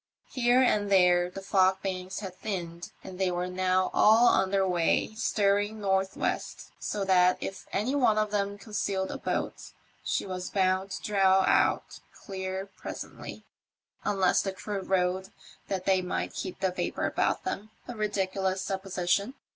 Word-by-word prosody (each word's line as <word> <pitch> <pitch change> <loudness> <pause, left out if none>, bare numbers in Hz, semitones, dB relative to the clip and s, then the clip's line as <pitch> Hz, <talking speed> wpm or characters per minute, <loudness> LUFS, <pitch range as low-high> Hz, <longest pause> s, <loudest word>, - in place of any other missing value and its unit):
Here 250 0 +3
and 205 -5 +1
there 180 -2 +4
the 195 +2 -9
fog 190 -1 +2
banks 185 0 -4
had 190 -3 -6
thinned, 175 -4 -5
and 185 0 -9
they 190 -1 +2
were 180 0 -1
now 185 0 +1
all 225 +3 +6
under 195 0 +2
way, 175 +3 +1
steering 205 -1 +1
north 190 -1 0
west, - - -3
so 200 -2 -2
that 180 -1 +4
if 195 - -6
any 220 +7 0
one 245 -7 +3
of 215 -1 +1
them 200 -1 -1
concealed 200 -2 -2
a - - -6
boat - - -3 0.3
she - - -1
was 185 -1 -5
bound 190 0 +1
to 195 - -6
draw 195 -2 +4
out - - +2 0.3
clear 190 0 -4
presently, 200 - -8 0.6
unless 195 -2 +2
the 195 - -3
crew 205 +1 -4
rowed 190 0 0 0.4
that 190 -2 -3
they 190 -1 +3
might 180 - -3
keep 185 - -6
the 190 -1 +1
vapour 180 - -2
about - - 0
them 210 +2 -4
— - - -32
a 245 - -6
ridiculous 190 -2 -1
supposition. 195 +4 -1
190 Hz, 160 wpm, -28 LUFS, 185-205 Hz, 0.6 s, all